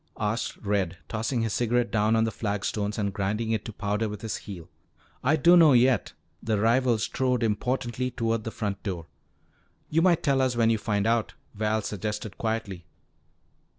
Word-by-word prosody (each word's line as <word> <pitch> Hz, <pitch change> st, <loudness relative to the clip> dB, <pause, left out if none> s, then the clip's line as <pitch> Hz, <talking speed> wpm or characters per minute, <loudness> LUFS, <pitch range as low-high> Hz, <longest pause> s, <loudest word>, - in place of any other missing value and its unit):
asked 105 Hz, +2 st, -2 dB
Red, 100 Hz, -4 st, -1 dB
tossing 115 Hz, +2 st, -1 dB
his 110 Hz, -3 st, -1 dB
cigarette 120 Hz, 0 st, +1 dB
down 110 Hz, +1 st, +2 dB
on 110 Hz, -, +3 dB
the 115 Hz, -, 0 dB
flagstones 105 Hz, -1 st, -2 dB
and 100 Hz, -2 st, -1 dB
grinding 105 Hz, +4 st, -1 dB
it 110 Hz, -2 st, 0 dB
to -, -, -5 dB
powder 105 Hz, +2 st, -2 dB
with 105 Hz, 0 st, -7 dB
his 110 Hz, -, -2 dB
heel. 90 Hz, -5 st, -9 dB, 0.6 s
"I 145 Hz, +5 st, +4 dB
dunno 165 Hz, -1 st, +6 dB
yet." 125 Hz, -2 st, +3 dB, 0.3 s
The 110 Hz, -2 st, 0 dB
rival 120 Hz, +2 st, +3 dB
strode 125 Hz, +2 st, 0 dB
importantly 125 Hz, +3 st, -1 dB
toward 115 Hz, -2 st, -1 dB
the 110 Hz, -, -3 dB
front 100 Hz, -3 st, -4 dB
door. 90 Hz, -5 st, -4 dB, 0.9 s
"You 160 Hz, +2 st, +3 dB
might 170 Hz, -1 st, +3 dB
tell 140 Hz, -3 st, +2 dB
us 130 Hz, -2 st, +1 dB
when 115 Hz, -1 st, +3 dB
you 110 Hz, -, +1 dB
find 105 Hz, -1 st, 0 dB
out," 115 Hz, -1 st, +1 dB, 0.2 s
Val 110 Hz, +1 st, 0 dB
suggested 105 Hz, 0 st, -4 dB
quietly. 105 Hz, -6 st, -3 dB
110 Hz, 170 wpm, -27 LUFS, 105-120 Hz, 0.9 s, dunno